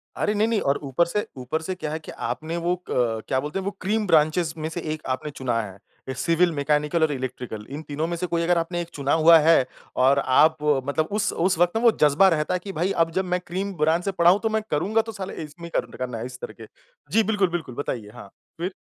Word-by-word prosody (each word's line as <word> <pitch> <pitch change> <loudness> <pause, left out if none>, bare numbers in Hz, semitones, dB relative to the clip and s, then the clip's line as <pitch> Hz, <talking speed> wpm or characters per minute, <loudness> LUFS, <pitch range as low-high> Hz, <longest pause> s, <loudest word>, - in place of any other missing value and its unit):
अरे, 210 - 0
नहीं, 215 +1 +2
नहीं 230 -2 +1
और 140 +1 +1
ऊपर 140 +5 +1
से 210 +5 -2
ऊपर 130 +5 -3
से 185 +3 -4
क्या 155 -4 -5
है 155 - -3
कि 155 - -10
आपने 155 +8 -4
वो 170 +1 0
अ, - - -18 0.5
क्या 130 - +1
बोलते 150 +7 -3
हैं 190 - -6
वो 200 - -1
क्रीम 210 +2 0
ब्रांचेज़ 160 0 +3
में 155 0 -3
से 170 +1 -5
एक 155 - -7
आपने 130 +3 -2
चुना 125 -5 -1
है। 100 -3 -9 0.4
सिविल 170 +6 +2
मैकेनिकल 150 +2 +1
और 155 - +2
इलेक्ट्रिकल, 125 -5 -5
इन 145 +3 -6
तीनों 150 +2 -2
में 170 - -2
से 180 +2 -2
कोई 170 -1 0
अगर 175 +1 +2
आपने 175 +1 -1
एक 170 - -7
चुना 140 -1 0
हुआ 165 +1 +7
है 160 -3 +5 0.3
और 135 +2 +4
आप 155 +5 +4 0.3
मतलब 155 +2 0
उस 205 - +1
उस 185 +1 +1
वक़्त 175 +3 +2
ना - - 0
वो 235 - +7
जज़्बा 150 +6 +5
रहता 155 -2 0
है 180 - 0
कि 200 - -5
भाई 180 +4 0
अब 165 - -6
जब 190 - +1
मैं 180 0 0
क्रीम 195 +3 -3
ब्रांच 160 +3 +2
से 195 - 0
पढ़ा 170 -2 +4
हूँ, 195 - +2
तो 225 - +2
मैं 220 0 0
करूँगा 200 +9 +2
तो 225 0 -7
साला 195 -3 -6
इसमें 155 +3 -10
ही - - -7
कर - - -4
ट - - -11
करना 125 -2 -4
है 115 - -5
इस 125 0 -8
करके। - - -9 0.5
जी, 225 - +4
बिल्कुल, 205 -3 +1
बिल्कुल 170 -8 -4
बताइए? 120 -6 -4
हाँ, 120 -5 -11 0.3
फिर? 175 +3 -3
165 Hz, 260 wpm, -24 LUFS, 145-180 Hz, 0.5 s, हुआ